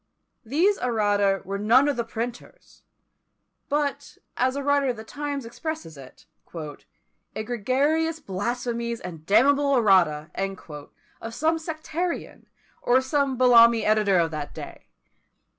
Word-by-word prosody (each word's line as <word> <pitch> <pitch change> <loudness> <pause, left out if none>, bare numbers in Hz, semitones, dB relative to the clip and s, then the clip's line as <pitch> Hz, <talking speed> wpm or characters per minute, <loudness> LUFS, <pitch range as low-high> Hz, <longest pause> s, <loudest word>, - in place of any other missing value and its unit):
These 330 - +1
errata 205 -5 +1
were 195 +1 -4
none 240 +7 +4
of 290 - +1
the 235 - -1
printer's; 230 +1 -8 0.9
but, 290 -1 -2 0.2
as 255 +1 +1
a 280 - -3
writer 285 0 +2
of 245 -3 -1
the 220 - -8
times 285 +1 -5
expresses 310 - -6
it, 135 -2 -14 1.1
"egregious 275 +9 0
blasphemies, 235 +1 -3
and 165 -4 -9
damnable 280 +6 +4
errata" 175 -9 +3 0.9
of 225 0 -7
some 320 +5 +1
sectarian, 325 +2 -5 0.3
or 250 +1 +3
some 270 0 0
Bellamy 235 -2 +6
editor 210 -3 +3
of 165 -1 +1
that 150 -2 -6
day! - - -10
245 Hz, 120 wpm, -25 LUFS, 210-285 Hz, 1.1 s, Bellamy